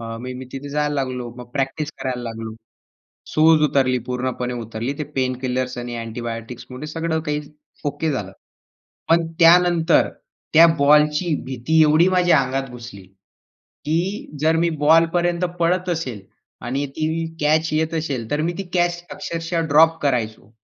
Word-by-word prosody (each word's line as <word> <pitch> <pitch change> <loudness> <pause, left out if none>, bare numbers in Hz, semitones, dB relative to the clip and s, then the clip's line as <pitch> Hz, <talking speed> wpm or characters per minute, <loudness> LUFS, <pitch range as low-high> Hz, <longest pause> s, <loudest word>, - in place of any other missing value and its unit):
अ, 115 0 -6
मी 130 +1 -6
तिथे 135 +1 -6
जायला 150 0 -1
लागलो. 130 -3 -3
मग 120 -1 -10
प्रॅक्टिस 140 +3 -2
करायला 125 -2 -3
लागलो. 115 -1 -6 0.8
सूज 155 0 +5
उतरली 130 -2 +2
पूर्णपणे 125 0 -2
उतरली. 115 +4 -4
ते 150 - -2
पेनकिलर्स 130 -1 -1
आणि 120 0 -5
अँटिबायोटिक्स 115 +1 -6
मध्ये 135 +4 -7
सगळं 160 +1 -2
काही 150 -2 -2 0.4
ओके 155 +2 -1
झालं. 100 -8 -4 0.8
पण 165 0 +3
त्यानंतर 170 0 +5 0.5
त्या 165 +2 +9
बॉलची 150 +3 +4
भीती 130 +5 0
एवढी 155 +4 +5
माझ्या 180 -4 +4
अंगात 135 +1 -2
घुसली, 120 -5 -10 0.8
की 170 +1 -2
जर 160 +1 +3
मी 170 +1 +2 0.2
बॉलपर्यंत 170 +2 +3
पळत 180 +2 +1
असेल 135 - -3 0.4
आणि 135 +4 -2
ती 160 +1 -1
कॅच 155 +2 +2
येत 160 +1 0
असेल 140 -8 -3
तर 145 +1 0
मी 170 +2 0
ती 195 - -2
कॅच 175 0 +1
अक्षरशः 165 0 -3
ड्रॉप 160 +3 +5
करायचो. 110 -7 -1
150 Hz, 140 wpm, -21 LUFS, 125-165 Hz, 0.8 s, त्या